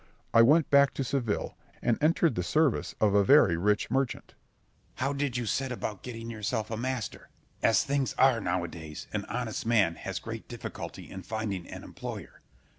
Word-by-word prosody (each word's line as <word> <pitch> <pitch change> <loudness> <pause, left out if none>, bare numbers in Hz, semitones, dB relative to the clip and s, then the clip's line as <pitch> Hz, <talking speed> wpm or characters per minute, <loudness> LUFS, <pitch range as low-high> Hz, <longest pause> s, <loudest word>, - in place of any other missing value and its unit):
I 115 - +8
went 150 +6 +5
back 140 -1 +5
to 135 - -1
Seville, 120 -5 -2 0.2
and 120 - +2
entered 165 -1 +3
the 90 - -1
service 150 - +1
of 105 -2 +3
a 100 0 +5
very 100 - +6
rich 105 +4 +1
merchant. 135 -1 -1
Scip. - - -31 0.6
How 135 +2 0
did 140 -3 -1
you 120 - -2
set 130 +4 -1
about 110 -5 -4
getting 115 -2 -7
yourself 110 0 -3
a - - -1
master? 125 -1 -4 0.3
As 115 - +4
things 140 -1 -1
are 130 -4 +4
now 90 -2 0
a - - -3
days, 80 -2 -8
an - - -2
honest 120 -3 -3
man 110 -7 +3
has - - -5
great - - -7
difficulty - - -7
in 95 - -7
finding 105 -4 -4
an - - -8
employer. - - -8
115 Hz, 190 wpm, -29 LUFS, 105-135 Hz, 0.6 s, I